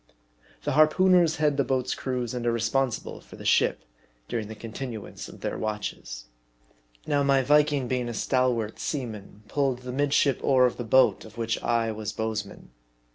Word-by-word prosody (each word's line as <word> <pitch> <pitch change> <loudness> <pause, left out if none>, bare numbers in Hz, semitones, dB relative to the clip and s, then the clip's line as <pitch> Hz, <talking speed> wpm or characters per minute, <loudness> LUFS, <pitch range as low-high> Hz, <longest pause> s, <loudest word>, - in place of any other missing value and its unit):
The - - -1
harpooneers 165 +3 +4
head 150 -2 +1
the 140 - +3
boats' 130 -1 -1
crews, 125 -3 -3
and 120 -1 -3
are - - +3
responsible 115 +2 -1
for - - -14
the - - -11
ship - - +2 0.4
during 110 -3 -3
the 110 - -8
continuance 115 0 -7
of - - -13
their - - -3
watches. 95 - -4 0.8
Now, 145 -1 +1
my 140 -1 +3
Viking 145 -1 +3
being 125 -1 -1
a - - -4
stalwart 125 -3 0
seaman, 110 -7 -5
pulled 135 -3 -1
the 125 - -5
midship 140 0 +2
oar 130 -2 +5
of 125 - 0
the 120 - -3
boat 130 +3 +4
of 110 +1 -14
which 115 -1 -1
I 115 -1 +1
was 110 -1 -5
bowsman. 110 - -4
125 Hz, 170 wpm, -26 LUFS, 110-140 Hz, 0.8 s, oar